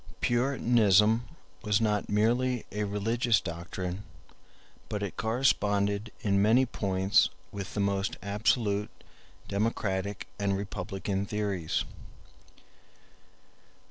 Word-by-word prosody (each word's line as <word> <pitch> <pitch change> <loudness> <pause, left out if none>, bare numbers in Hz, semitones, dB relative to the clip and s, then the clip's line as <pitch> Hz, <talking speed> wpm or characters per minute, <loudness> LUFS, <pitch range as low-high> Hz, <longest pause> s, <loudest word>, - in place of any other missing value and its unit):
Puritanism 120 -3 +3 0.3
was 105 0 +2
not 105 -2 0
merely 120 +4 +1
a 105 0 -1
religious 115 +3 +1
doctrine, 90 +2 -5 0.9
but 105 -1 -2
it 100 - -4
corresponded 105 -3 +1
in 100 -2 +2
many 115 +6 +5
points 95 -4 +2 0.2
with 100 -1 -6
the - - -1
most 100 0 0
absolute 105 0 +1 0.6
democratic 100 -2 -1
and 100 -1 +1
republican 95 0 -3
theories. 100 -6 -1
105 Hz, 90 wpm, -29 LUFS, 100-110 Hz, 0.9 s, many